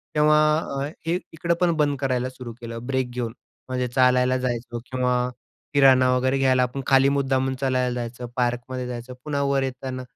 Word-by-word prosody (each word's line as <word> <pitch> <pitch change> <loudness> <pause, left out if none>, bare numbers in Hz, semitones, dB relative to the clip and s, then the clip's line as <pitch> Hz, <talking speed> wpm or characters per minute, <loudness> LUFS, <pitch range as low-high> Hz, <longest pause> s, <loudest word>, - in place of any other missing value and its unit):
तेव्हा 150 0 +5 0.2
अ, 140 -3 -3 0.2
हे 175 +2 +1
इकडं 170 +2 0
पण 175 -1 +4
बंद 145 -2 +2
करायला 130 -2 0
सुरू 125 -2 -9
केलं. 115 0 -6
ब्रेक 130 -2 0
घेऊन 120 -2 -3 0.4
म्हणजे 125 -1 -1
चालायला 125 0 +3
जायचो 120 -1 -3
किंवा 125 -1 +1 0.6
किराणा 130 -2 +6
वगैरे 130 +2 +1
घ्यायला 130 -1 +3
आपण 125 +2 -3
खाली 135 0 +5
मुद्दामून 135 -1 0
चालायला 130 -2 +1
जायचं, 120 +1 -5
पार्कमध्ये 125 +1 -1
जायचं. 125 +1 -6
पुन्हा 145 -2 -2
वर 140 -1 +1
येताना 130 0 -4
130 Hz, 165 wpm, -24 LUFS, 125-135 Hz, 0.6 s, किराणा